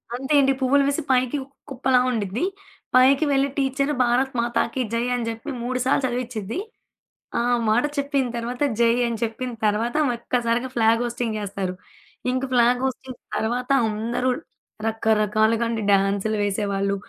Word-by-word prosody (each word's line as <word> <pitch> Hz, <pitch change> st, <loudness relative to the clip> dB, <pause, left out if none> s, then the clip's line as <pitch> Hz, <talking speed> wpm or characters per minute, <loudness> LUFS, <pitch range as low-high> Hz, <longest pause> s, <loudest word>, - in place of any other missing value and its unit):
అంతే 265 Hz, +4 st, -2 dB
అండి. 270 Hz, 0 st, +3 dB
పువ్వులు 280 Hz, +2 st, +4 dB
వేసి 285 Hz, +3 st, 0 dB
పైకి 255 Hz, +2 st, +2 dB
ఒక 275 Hz, -, -20 dB, 0.2 s
కుప్పలా 260 Hz, -1 st, +2 dB
ఉండిద్ది. 220 Hz, -, -2 dB, 0.5 s
పైకి 270 Hz, +4 st, +5 dB
వెళ్ళి 275 Hz, 0 st, +2 dB
టీచరు, 275 Hz, +2 st, 0 dB
"భారత్ 255 Hz, +3 st, +1 dB
మాతాకి 240 Hz, +1 st, 0 dB
జై" 230 Hz, +1 st, +1 dB
అని 240 Hz, -2 st, -2 dB
జెప్పి 225 Hz, +6 st, -6 dB
3 255 Hz, +1 st, -2 dB
సార్లు 270 Hz, +1 st, +2 dB
చదివిచిద్ది. 245 Hz, -, -3 dB, 0.8 s
ఆ -, -, +2 dB, 0.3 s
మాట 235 Hz, +5 st, +3 dB
చెప్పిన 280 Hz, -2 st, 0 dB
తర్వాత, 245 Hz, +3 st, -5 dB, 0.2 s
జై 230 Hz, 0 st, +5 dB
అని 230 Hz, -1 st, -2 dB
చెప్పిన 240 Hz, +3 st, -3 dB
తర్వాత, 220 Hz, +5 st, 0 dB, 0.2 s
ఒక్కసారిగా 240 Hz, +1 st, -1 dB
ఫ్లాగ్ 230 Hz, 0 st, +3 dB
హోస్టింగ్ 235 Hz, -2 st, -2 dB
చేస్తారు. 195 Hz, -2 st, -3 dB, 0.6 s
ఇంక 255 Hz, +1 st, -1 dB
ఫ్లాగ్ 245 Hz, +1 st, +4 dB
హోస్టింగ్ 260 Hz, 0 st, -5 dB, 0.2 s
తర్వాత 245 Hz, +3 st, -2 dB, 0.2 s
అందరూ 230 Hz, +4 st, -1 dB, 0.6 s
రకరకాలుగా 220 Hz, +1 st, +2 dB
అండి, 225 Hz, -1 st, -2 dB
డ్యాన్సులు 200 Hz, +2 st, +2 dB
వేసేవాళ్ళు, 200 Hz, -1 st, 0 dB
240 Hz, 140 wpm, -23 LUFS, 220-260 Hz, 0.8 s, పైకి